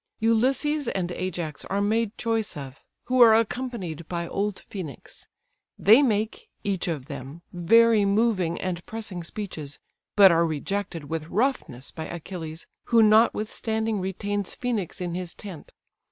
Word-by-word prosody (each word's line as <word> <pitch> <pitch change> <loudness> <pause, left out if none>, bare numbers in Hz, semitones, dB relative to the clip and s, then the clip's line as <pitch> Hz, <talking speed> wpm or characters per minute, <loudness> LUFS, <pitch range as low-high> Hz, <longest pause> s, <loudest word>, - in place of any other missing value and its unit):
Ulysses 260 +6 +2
and 180 -4 -2
Ajax 175 -4 -4
are 200 - -1
made 220 +1 0
choice 225 -6 -1
of, 135 -2 -9 0.2
who 255 0 +2
are 225 -2 +9
accompanied 220 - -2
by 170 -1 -3
old 205 +2 -1
Phœnix. 175 - -9 0.5
They 220 +7 +7
make, 225 - 0
each 195 -4 -1
of 155 -6 -3
them, 140 +3 -8
very 225 +5 +5
moving 200 -4 +1
and 175 -2 -3
pressing 215 -5 -4
speeches, 165 -7 -6 0.4
but 195 -3 +8
are 170 0 +3
rejected 165 +2 -3
with 155 +2 -4
roughness 190 - -1
by 160 - -6
Achilles, 165 -2 -7 0.2
who 230 -1 +5
notwithstanding 220 0 +2
retains 200 +1 -3
Phœnix 225 -9 -3
in 175 -1 -3
his 180 -1 -4
tent. 190 -7 -10
200 Hz, 140 wpm, -26 LUFS, 170-225 Hz, 0.5 s, are